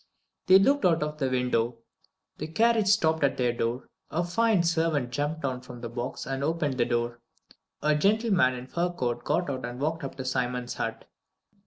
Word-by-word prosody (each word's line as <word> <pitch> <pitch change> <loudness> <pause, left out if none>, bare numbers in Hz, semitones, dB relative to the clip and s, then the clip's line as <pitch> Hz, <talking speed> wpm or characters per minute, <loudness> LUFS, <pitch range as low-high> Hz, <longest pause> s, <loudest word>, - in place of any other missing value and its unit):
They 185 - +9
looked 275 +8 +3
out 165 -4 +3
of 150 0 -5
the 135 -2 +1
window; 125 -2 0 0.6
the 155 - -3
carriage 220 +4 +2
stopped 160 -6 +3
at 140 - +2
their 125 -2 +1
door, 120 +2 -2 0.2
a 170 +3 0
fine 205 +2 +2
servant 160 -6 +1
jumped 145 +4 -2
down 130 -2 -2
from 125 -1 -11
the 120 - -5
box 120 +2 -5
and 135 +1 -3
opened 150 -4 -1
the 120 - +4
door. 120 0 -1 0.6
A 150 - +4
gentleman 195 - +3
in 125 - -6
a - - -13
fur 175 +6 -1
coat 120 -8 -3
got 170 +4 0
out 130 -3 -3
and 120 +1 -5
walked 160 +3 -1
up 135 - -5
to 130 - -6
Simon's 125 -1 -2
hut. - - -4
145 Hz, 195 wpm, -27 LUFS, 125-170 Hz, 0.6 s, They